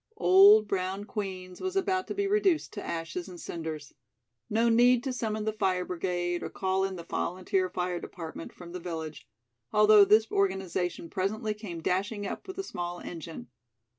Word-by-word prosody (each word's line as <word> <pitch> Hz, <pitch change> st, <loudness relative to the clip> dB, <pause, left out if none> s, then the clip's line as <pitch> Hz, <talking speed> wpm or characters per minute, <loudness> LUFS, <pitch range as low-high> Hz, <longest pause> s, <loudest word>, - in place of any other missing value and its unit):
Old 200 Hz, +4 st, +7 dB
brown 190 Hz, +1 st, -2 dB
Queen's 190 Hz, -4 st, -6 dB
was 375 Hz, 0 st, -3 dB
about 380 Hz, -1 st, 0 dB
to -, -, -4 dB
be 400 Hz, 0 st, 0 dB
reduced 395 Hz, -5 st, +2 dB
to 205 Hz, -, -6 dB
ashes 170 Hz, +2 st, -4 dB
and 175 Hz, -1 st, -10 dB
cinders! 160 Hz, -4 st, -6 dB, 0.6 s
No 225 Hz, +2 st, +2 dB
need 240 Hz, +1 st, +5 dB
to 265 Hz, -2 st, -2 dB
summon 215 Hz, -3 st, -2 dB
the 220 Hz, -, 0 dB
fire 185 Hz, -4 st, 0 dB
brigade 175 Hz, -1 st, -2 dB
or -, -, -4 dB
call 190 Hz, 0 st, 0 dB
in 190 Hz, -1 st, -2 dB
the 170 Hz, -, -7 dB
volunteer 185 Hz, +2 st, -1 dB
fire 180 Hz, -1 st, -2 dB
department 165 Hz, -2 st, -8 dB
from 175 Hz, -1 st, -12 dB
the 180 Hz, -, -5 dB
village, 160 Hz, -3 st, -6 dB, 0.4 s
although 210 Hz, -1 st, +7 dB
this 215 Hz, +2 st, +4 dB
organization 190 Hz, -3 st, -1 dB
presently 215 Hz, +5 st, -2 dB
came 185 Hz, -6 st, -8 dB
dashing 200 Hz, +4 st, -1 dB
up -, -, -6 dB
with 375 Hz, -, -7 dB
a 390 Hz, -, -2 dB
small 175 Hz, -, -5 dB
engine. 160 Hz, -7 st, -8 dB
190 Hz, 170 wpm, -29 LUFS, 175-215 Hz, 0.6 s, Old